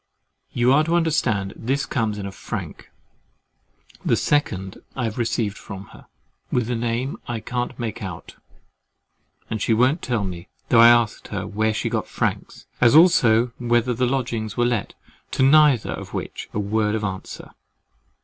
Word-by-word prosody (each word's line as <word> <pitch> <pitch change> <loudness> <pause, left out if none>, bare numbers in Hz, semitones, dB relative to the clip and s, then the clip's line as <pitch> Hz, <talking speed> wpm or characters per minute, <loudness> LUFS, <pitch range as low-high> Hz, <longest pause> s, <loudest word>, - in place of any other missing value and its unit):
You 125 +2 +3
are 150 +2 +5
to 165 +2 +1
understand, 130 - +1
this 135 +4 -1
comes 110 -4 -1
in 100 - -5
a 100 - -5
frank, - - -7 1.1
the - - +2
second 95 -10 -1
I 125 - -2
have 115 +1 -3
received 115 -3 -1
from 100 -2 -9
her, - - -16 0.4
with 125 -1 0
a - - 0
name 120 +4 -2
I 120 -2 -3
can't 120 +2 -4
make 115 -1 -4
out, 95 -4 -7 1.1
and 110 -2 -4
she 115 - +2
won't 130 +8 +2
tell 120 -5 -1
me, 90 -3 -6 0.2
though 115 - +5
I 115 0 +9
asked 120 -2 +2
her, 100 -2 -4
where 110 +2 0
she 110 - -2
got - - -2
franks, - - -3 0.2
as 120 +3 +6
also 120 -9 +5
whether 120 0 +1
the 125 +2 0
lodgings 115 -4 -2
were 120 - +3
let, 120 -4 -1 0.4
to - - +2
neither 145 -3 +5
of - - -7
which - - -5
a - - -5
word 105 +1 0
of 110 - -3
answer. 95 -2 -6
115 Hz, 170 wpm, -22 LUFS, 105-125 Hz, 1.1 s, I